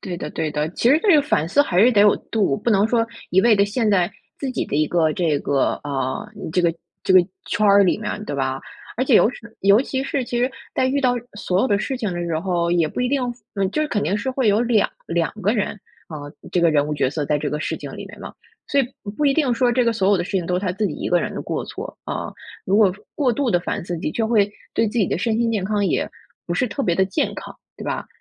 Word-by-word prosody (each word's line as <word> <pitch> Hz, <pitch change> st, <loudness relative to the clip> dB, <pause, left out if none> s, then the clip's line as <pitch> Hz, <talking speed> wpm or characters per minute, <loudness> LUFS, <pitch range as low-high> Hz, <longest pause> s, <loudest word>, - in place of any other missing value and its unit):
对 180 Hz, -2 st, -5 dB
的， 150 Hz, -3 st, -5 dB
对 155 Hz, -, -2 dB
的， 150 Hz, +1 st, -1 dB
其 230 Hz, -, +1 dB
实 300 Hz, -, +6 dB
这 400 Hz, -6 st, +5 dB
个 290 Hz, -, +5 dB
反 165 Hz, -, 0 dB
思 285 Hz, -, +3 dB
还 185 Hz, -9 st, +1 dB
是 245 Hz, +4 st, +6 dB
得 210 Hz, -, +4 dB
有 205 Hz, 0 st, +6 dB, 0.2 s
度， 195 Hz, -11 st, +1 dB
不 235 Hz, -, -1 dB
能 205 Hz, 0 st, +4 dB
说 230 Hz, -1 st, +1 dB, 0.2 s
一 190 Hz, -, +5 dB
味 220 Hz, 0 st, +5 dB
地 200 Hz, -, +4 dB
陷 215 Hz, +1 st, 0 dB
在 180 Hz, -3 st, +2 dB, 0.3 s
自 275 Hz, -, -3 dB
己 -, -, -1 dB
的 -, -, -3 dB
一 155 Hz, 0 st, +2 dB
个 160 Hz, -2 st, +2 dB
这 160 Hz, -4 st, +1 dB
个 140 Hz, -1 st, 0 dB
啊， 135 Hz, -3 st, -3 dB, 0.3 s
这 180 Hz, -, +2 dB
个 170 Hz, -1 st, +3 dB, 0.3 s
这 190 Hz, -, +2 dB
个 185 Hz, -, +9 dB, 0.3 s
圈 210 Hz, 0 st, +1 dB
儿 200 Hz, 0 st, +6 dB
里 185 Hz, -, +2 dB
面 210 Hz, -1 st, -4 dB
对 145 Hz, -, -4 dB
吧？ 130 Hz, 0 st, -1 dB, 0.4 s
而 255 Hz, -, +1 dB
且 255 Hz, -, +3 dB
尤 -, -, +6 dB
是 230 Hz, -3 st, -13 dB
尤 200 Hz, +4 st, +5 dB
其 265 Hz, -1 st, -2 dB
是， 270 Hz, -2 st, -1 dB
其 240 Hz, 0 st, -3 dB
实 250 Hz, +2 st, +1 dB, 0.2 s
在 260 Hz, -, +2 dB
遇 280 Hz, +2 st, +1 dB
到 250 Hz, -2 st, +2 dB, 0.2 s
所 185 Hz, -2 st, 0 dB
有 -, -, +2 dB
的 205 Hz, -4 st, +2 dB
事 265 Hz, +4 st, -2 dB
情 210 Hz, -7 st, -2 dB
的 175 Hz, -, -3 dB
时 165 Hz, -2 st, -1 dB
候， 170 Hz, -1 st, 0 dB
也 170 Hz, -2 st, +3 dB
不 155 Hz, -, -4 dB
一 250 Hz, -, +1 dB
定， 275 Hz, 0 st, +1 dB, 0.3 s
嗯， 195 Hz, -1 st, 0 dB
就 305 Hz, -, 0 dB
是 300 Hz, -, -2 dB
肯 205 Hz, -6 st, -1 dB
定 200 Hz, -, 0 dB
是 265 Hz, +5 st, -2 dB
会 255 Hz, -4 st, +1 dB
有 205 Hz, +3 st, +3 dB
2 235 Hz, -3 st, +2 dB, 0.2 s
2 170 Hz, -1 st, 0 dB
个 205 Hz, +4 st, +2 dB
人 210 Hz, -4 st, 0 dB, 0.4 s
啊， 155 Hz, -, -6 dB, 0.4 s
这 180 Hz, -, +2 dB
个 170 Hz, -1 st, +4 dB
人 145 Hz, -1 st, +2 dB
物 150 Hz, -, -2 dB
角 135 Hz, -2 st, +1 dB
色 150 Hz, 0 st, -2 dB
在 150 Hz, +1 st, +1 dB
这 145 Hz, -1 st, -3 dB
个 150 Hz, -, -2 dB
事 -, -, -2 dB
情 -, -, -8 dB
里 -, -, -7 dB
面 -, -, -12 dB
嘛。 -, -, -8 dB, 0.4 s
所 280 Hz, -, +3 dB
以 -, -, +1 dB, 0.2 s
不 205 Hz, -, -6 dB
不 295 Hz, -, -2 dB
一 275 Hz, -, +4 dB
定 275 Hz, -5 st, +2 dB
说 245 Hz, 0 st, +2 dB
这 245 Hz, 0 st, +2 dB
个 235 Hz, -, +2 dB
所 195 Hz, -3 st, +1 dB
有 200 Hz, -, +5 dB
的 175 Hz, -, -1 dB
事 195 Hz, -, -8 dB
情 185 Hz, -3 st, 0 dB
都 180 Hz, -, 0 dB
是 -, -, -4 dB
他 185 Hz, -3 st, -1 dB
自 210 Hz, +2 st, -1 dB
己 155 Hz, -, -4 dB
一 -, -, -4 dB
个 175 Hz, -1 st, +3 dB
人 -, -, -3 dB
的 -, -, -4 dB
过 -, -, -3 dB
错， -, -, -8 dB
啊。 -, -, -4 dB, 0.3 s
如 195 Hz, +2 st, +2 dB
果 200 Hz, -4 st, +5 dB, 0.2 s
过 260 Hz, -5 st, +1 dB
度 260 Hz, +1 st, 0 dB
地 175 Hz, -, +3 dB
反 170 Hz, -, -3 dB
思 175 Hz, -, -4 dB
自 165 Hz, -, -5 dB
己， 155 Hz, -, -2 dB
就 225 Hz, +4 st, -1 dB
会 210 Hz, -3 st, +3 dB, 0.2 s
对 225 Hz, -, +2 dB
自 230 Hz, +3 st, -2 dB
己 200 Hz, -, +3 dB
的 -, -, -1 dB
身 220 Hz, +2 st, 0 dB
心 235 Hz, -1 st, +1 dB
健 200 Hz, -4 st, -1 dB
康 205 Hz, 0 st, 0 dB
也 -, -, 0 dB, 0.4 s
不 175 Hz, -, -2 dB
是 250 Hz, -, +1 dB
特 275 Hz, +7 st, -3 dB
别 175 Hz, -, +1 dB
地 190 Hz, +2 st, +3 dB
健 190 Hz, -, -1 dB
康， -, -, -9 dB, 0.2 s
对 -, -, -9 dB
吧？ -, -, -3 dB
200 Hz, 310 characters per minute, -21 LUFS, 175-240 Hz, 0.4 s, 个